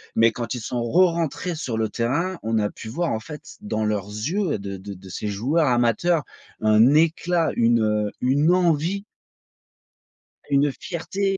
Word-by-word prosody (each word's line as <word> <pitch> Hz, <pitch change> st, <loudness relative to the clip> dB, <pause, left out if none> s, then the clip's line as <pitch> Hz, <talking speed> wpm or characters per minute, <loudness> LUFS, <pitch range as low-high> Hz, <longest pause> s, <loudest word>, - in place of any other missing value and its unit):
Mais 115 Hz, 0 st, +5 dB
quand 120 Hz, +2 st, -4 dB
ils -, -, -4 dB
sont 120 Hz, +2 st, -3 dB
rerentrés 170 Hz, +4 st, +1 dB
sur 130 Hz, -8 st, -3 dB
le 110 Hz, 0 st, +1 dB
terrain, 155 Hz, -, -1 dB
on 110 Hz, 0 st, 0 dB
a 105 Hz, -1 st, 0 dB
pu -, -, -10 dB
voir, 165 Hz, +9 st, -1 dB
en 110 Hz, -, -1 dB
fait, 150 Hz, +7 st, -10 dB
dans 110 Hz, -, -2 dB
leurs 105 Hz, -2 st, -1 dB
yeux, 105 Hz, -, -3 dB, 0.2 s
heu, -, -, -2 dB
de 100 Hz, -1 st, -6 dB
de 100 Hz, +1 st, -8 dB
de 95 Hz, +1 st, -13 dB
ces 95 Hz, +3 st, -4 dB
joueurs 135 Hz, +11 st, +1 dB
amateurs, 125 Hz, +7 st, +2 dB, 0.4 s
un 110 Hz, +5 st, +5 dB
éclat, 165 Hz, +1 st, +2 dB
une, 115 Hz, 0 st, +3 dB
heu, 105 Hz, -1 st, 0 dB
une 145 Hz, +6 st, +3 dB
envie 175 Hz, +2 st, +1 dB, 1.5 s
une 140 Hz, +1 st, +3 dB
fierté 195 Hz, +3 st, -2 dB
125 Hz, 170 wpm, -23 LUFS, 110-165 Hz, 1.5 s, Mais